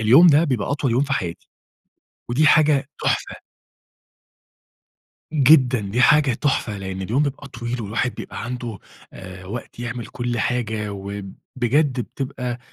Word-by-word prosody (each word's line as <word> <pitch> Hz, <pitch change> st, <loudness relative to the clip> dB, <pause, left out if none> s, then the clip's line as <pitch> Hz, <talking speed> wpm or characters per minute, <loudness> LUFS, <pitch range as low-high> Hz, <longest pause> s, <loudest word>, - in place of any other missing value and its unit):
اليوم 125 Hz, +11 st, +7 dB
ده 155 Hz, 0 st, +6 dB
بيبقى 125 Hz, -10 st, -1 dB
أطول 140 Hz, -2 st, 0 dB
يوم 120 Hz, +4 st, +2 dB
في 140 Hz, -, -4 dB
حياتي، 90 Hz, -11 st, -3 dB, 0.8 s
ودي 145 Hz, +6 st, +3 dB
حاجة 150 Hz, -3 st, +4 dB
تحفة. -, -, -1 dB, 1.9 s
جدًا 135 Hz, -5 st, +5 dB
دي 105 Hz, +4 st, -2 dB
حاجة 150 Hz, -1 st, +5 dB
تحفة؛ 135 Hz, -1 st, 0 dB
لأن 95 Hz, -1 st, -5 dB
اليوم 115 Hz, +9 st, +1 dB
بيبقى 140 Hz, -1 st, -4 dB
طويل، 120 Hz, -1 st, -5 dB
والواحد 110 Hz, +4 st, -2 dB
بيبقى -, -, -7 dB
عنده، 120 Hz, -3 st, -5 dB, 0.3 s
آآ، 95 Hz, 0 st, -10 dB
وقت 115 Hz, +3 st, -7 dB
يعمل 120 Hz, -1 st, -5 dB
كل 120 Hz, -1 st, -3 dB
حاجة، 110 Hz, -3 st, -1 dB
وبجد 115 Hz, +8 st, -2 dB
بتبقى 125 Hz, -1 st, -4 dB
125 Hz, 130 wpm, -22 LUFS, 110-140 Hz, 1.9 s, اليوم